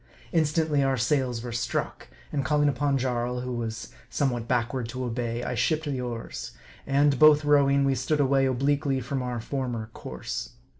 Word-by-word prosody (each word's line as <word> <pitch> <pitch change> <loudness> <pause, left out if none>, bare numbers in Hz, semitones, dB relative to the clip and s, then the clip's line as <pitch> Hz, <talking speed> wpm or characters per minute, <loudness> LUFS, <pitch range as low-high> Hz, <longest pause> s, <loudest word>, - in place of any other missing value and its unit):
Instantly 155 -2 +2
our 135 -1 +2
sails 125 -1 0
were 120 - -5
struck; 115 - -3 0.2
and 140 -2 -1
calling 145 +2 +2
upon 140 0 +1
Jarl, 125 -1 -1
who 125 0 -4
was 115 -1 -4 0.2
somewhat 120 -5 -1
backward 120 0 -1
to 130 +1 -4
obey, 120 0 -2
I - - -2
shipped 150 +6 +1
the 135 -3 -2
oars; 120 - -5 0.3
and, 140 -1 +3
both 150 -1 +7
rowing, 140 -1 +4
we 135 - +3
stood 150 +3 0
away 135 -1 +3
obliquely 140 +1 +1
from 130 +2 -3
our 125 -1 -3
former 120 -3 -4
course. 65 -1 -6
130 Hz, 165 wpm, -27 LUFS, 120-145 Hz, 0.3 s, both